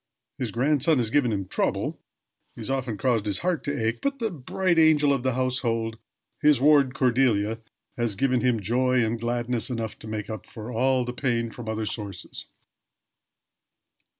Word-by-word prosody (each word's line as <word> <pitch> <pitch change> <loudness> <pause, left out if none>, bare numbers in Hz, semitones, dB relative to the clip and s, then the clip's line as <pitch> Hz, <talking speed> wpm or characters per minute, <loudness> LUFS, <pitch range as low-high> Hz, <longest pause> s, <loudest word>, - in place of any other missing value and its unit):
His 125 -3 -1
grandson 145 +6 +2
has 115 -3 0
given 130 -4 +3
him 100 -3 -2
trouble - - -1 0.6
has - - -4
often 130 -5 -2
caused 115 -3 +1
his 100 - 0
heart 175 -3 -1
to 140 -6 -1
ache; 115 - -1
but 280 0 -1
the 225 -4 -2
bright 170 +3 0
angel 150 -3 +5
of 135 - -1
the 130 -1 0
household 115 -3 -1 0.4
his 150 -3 +5
ward 140 -2 +4
Cordelia 115 -4 +2 0.4
has 120 -4 -1
given 125 +3 +1
him 125 -3 +2
joy 125 +4 +2
and 115 +1 -2
gladness 120 0 -1
enough 115 -3 -4
to - - -10
make 110 -1 -4
up 110 -4 -7
for 115 0 -8
all 130 +2 +2
the 125 - -4
pain 120 -3 -1
from 115 -2 -7
other 110 0 -2
sources. 100 -4 -6
125 Hz, 170 wpm, -26 LUFS, 110-135 Hz, 0.6 s, angel